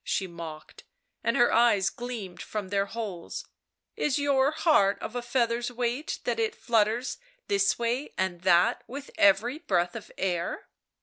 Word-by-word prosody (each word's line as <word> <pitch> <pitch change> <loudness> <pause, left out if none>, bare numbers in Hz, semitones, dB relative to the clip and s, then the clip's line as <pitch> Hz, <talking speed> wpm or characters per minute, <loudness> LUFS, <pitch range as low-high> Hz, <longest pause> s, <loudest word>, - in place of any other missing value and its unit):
she 190 - -1
mocked, 165 -3 -9 0.4
and 230 - +1
her 240 -1 +4
eyes 225 -5 +4
gleamed 225 -8 -6
from 205 -3 -5
their 200 0 +1
holes; 200 -6 -5 0.5
"is 295 -2 +1
your 280 -1 +3
heart 305 - +3
of 225 - -6
a 245 - -1
feather's 240 -1 0
weight 245 +4 -2
that - - -1
it 445 -2 0
flutters 230 - +1 0.3
this 200 0 +2
way 240 +4 -1
and 185 -2 -1
that 175 -1 +4
with 280 +3 -8
every 215 +8 +4
breath 175 - 0
of 225 - -8
air 175 -3 -2
230 Hz, 150 wpm, -28 LUFS, 190-250 Hz, 0.5 s, her